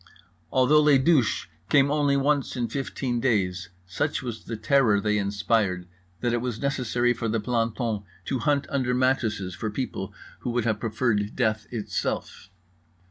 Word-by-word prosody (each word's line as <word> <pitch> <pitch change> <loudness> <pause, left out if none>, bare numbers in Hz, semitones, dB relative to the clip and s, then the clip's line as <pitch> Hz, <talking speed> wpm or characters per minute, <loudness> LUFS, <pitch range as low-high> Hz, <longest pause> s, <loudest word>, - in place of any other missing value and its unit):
Although 135 +4 +5
les 150 -2 +6
douches 135 -4 +2 0.2
came 140 -1 +4
only 145 -2 +2
once 140 0 +1
in 120 -2 -1
15 130 -1 -2
days, 100 -6 0 0.2
such 145 +11 -2
was 120 -3 -6
the 115 - -4
terror 110 -2 +3
they 105 0 +1
inspired 100 -2 0 0.3
that 120 -1 +1
it 120 - 0
was 120 -3 -3
necessary 125 -3 +1
for 115 -1 -3
the 115 +1 0
planton 115 -1 -1 0.2
to 130 - -1
hunt 145 +1 +1
under 130 -3 +1
mattresses 115 -7 0
for 110 +5 -3
people 105 -4 -4 0.3
who - - -4
would 120 -1 0
have 110 -2 0
preferred 110 -2 0
death 110 -4 0
itself. 105 -3 -3
120 Hz, 155 wpm, -26 LUFS, 105-135 Hz, 0.3 s, les